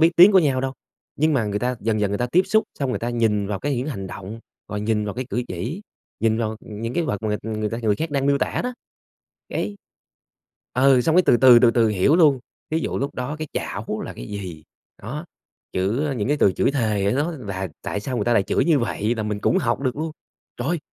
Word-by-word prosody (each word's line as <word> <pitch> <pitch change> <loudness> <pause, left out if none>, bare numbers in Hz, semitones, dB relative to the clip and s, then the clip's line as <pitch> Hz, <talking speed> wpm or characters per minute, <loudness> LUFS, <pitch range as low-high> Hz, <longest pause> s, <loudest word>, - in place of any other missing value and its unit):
biết 165 +1 +6
tiếng 185 +4 +9
của 190 - +7
nhau 140 -7 +2
đâu, 135 0 -2 0.4
nhưng 155 +2 +2
mà 120 -5 +2
người 105 -1 -1
ta 125 +3 -1
dần 110 0 0
dần 105 -1 +1
người 100 - -1
ta 120 - 0
tiếp 170 +9 +3
xúc 220 0 +3
xong 135 -2 -1
người - - -1
ta 120 - -2
nhìn 110 -4 +1
vào 100 -1 -2
cái 145 -2 -1
những 125 +5 -2
hành 100 -10 -4
động, 100 +4 -8 0.3
rồi 105 - -3
nhìn 105 0 0
vào 105 - -4
cái 130 +1 -3
cử 125 - 0
chỉ, 115 - -4 0.4
nhìn 110 0 +2
vào, 110 -2 0
ừm, 105 -1 -9
những 115 +2 -3
cái 170 - +1
vật 105 -8 -3
mà 105 -1 0
người 110 -1 -3
ta 115 - -3
người 105 -3 +1
khác 160 -1 -3
đang 140 -1 0
miêu 140 0 +3
tả 125 - -1
đó. 250 0 -3 0.7
Cái 205 - -3 1.0
ừ, 130 0 +5
xong 160 +7 +2
cái 185 - +7
từ - - +6
từ, 120 0 +8
từ 120 -1 +5
từ 115 -1 +3
hiểu 105 - +3
luôn. 150 -6 +5 0.3
Thí 160 - +1
dụ - - -2
lúc 140 +2 -3
đó 125 +4 -4
cái 155 - -5
chảo - - -4
là - - -6
cái - - -8
gì? 90 -6 -6 0.4
Đó. 150 - -5 0.5
Chữ, 105 +11 0
a, 145 - -1
những 115 -2 -2
cái 145 - +2
từ 100 - +4
chửi - - +1
thề 110 -7 0
á - - +2
nó 145 +6 0
là 100 - -5
tại 100 - -3
sao 125 +4 -3
người - - 0
ta 120 - +2
lại 115 - +4
chửi 130 - +1
như 155 -2 +4
vậy 115 -2 -1
nà 110 - -2
mình 105 -1 -3
cũng 110 - +2
học 120 +2 0
được 130 -2 -1
luôn. 160 +1 -3 0.4
Trời! 155 +8 -1
120 Hz, 260 wpm, -23 LUFS, 105-140 Hz, 1.0 s, tiếng